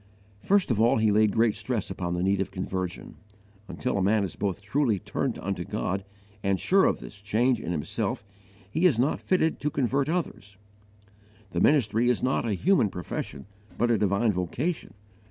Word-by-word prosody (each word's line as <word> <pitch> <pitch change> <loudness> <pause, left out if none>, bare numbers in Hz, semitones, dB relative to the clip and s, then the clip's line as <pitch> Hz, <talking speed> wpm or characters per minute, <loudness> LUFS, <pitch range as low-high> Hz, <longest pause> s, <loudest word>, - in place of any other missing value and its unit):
First 195 - +2
of 110 -2 +1
all 115 +1 +4
he 110 -1 +3
laid 105 0 +4
great 115 +1 +3
stress 110 0 -3
upon 90 -1 -3
the 90 - -1
need 95 +1 +2
of 95 - -2
conversion. 95 -1 -5 0.5
Until 125 -5 -2
a - - +1
man 100 +2 +3
is 95 - -4
both 100 -2 -2
truly 115 +1 +1
turned - - -3
unto - - -3
God 95 +1 -3 0.4
and 100 -1 0
sure 195 +1 +4
of - - +1
this 100 - -10
change 115 +5 +1
in 85 - -4
himself 80 +4 -2 0.5
he 165 +4 +4
is 140 -10 +2
not 130 +5 +1
fitted 160 -4 +1
to 150 - -1
convert 135 +1 0
others. 105 - -3 0.9
The 85 - -1
ministry 120 -4 +3
is 125 - +1
not 130 -1 +1
a 110 - 0
human 170 - +3
profession, 85 -6 -6 0.3
but 120 0 +2
a 115 - +3
divine 105 +3 +2
vocation. 110 - -3
110 Hz, 180 wpm, -27 LUFS, 95-130 Hz, 0.9 s, all